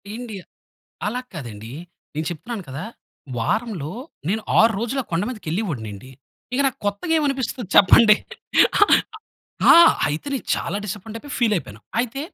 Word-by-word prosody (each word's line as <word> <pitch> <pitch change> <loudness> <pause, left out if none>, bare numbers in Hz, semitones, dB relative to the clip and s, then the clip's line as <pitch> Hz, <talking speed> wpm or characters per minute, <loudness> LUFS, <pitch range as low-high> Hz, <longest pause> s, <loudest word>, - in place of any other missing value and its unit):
ఎండి 230 -4 -7 0.7
అలా 250 +4 -2
కాదండీ. 115 -5 -8 0.4
నేను 155 +1 -2
చెప్తున్నాను 205 +5 -6
కదా! 145 +9 -5 0.5
వారంలో 175 - -2 0.4
నేను 220 +2 0 0.2
6 225 +1 +6
రోజులు 240 +4 -2
ఆ - - -27
కొండ 165 +4 +1
మీదకి 215 -9 -8
వెళ్ళేవోడినండి. 130 - -4 0.4
ఇక 260 - 0
నాకు 260 - -4
కొత్తగా 205 - -1
ఏమనిపిస్తుంది 260 - -2
చెప్పండి? 210 +2 +7 1.6
ఆ! - - +9 0.3
అయితే 150 - -4
నేను 265 - -4
చాలా - - -3
డిసప్పాయింటయిపోయి 225 +7 -7
ఫీలైయిపోయాను. 185 - 0 0.2
అయితే 250 +3 -4
210 Hz, 125 wpm, -22 LUFS, 155-240 Hz, 1.6 s, ఆ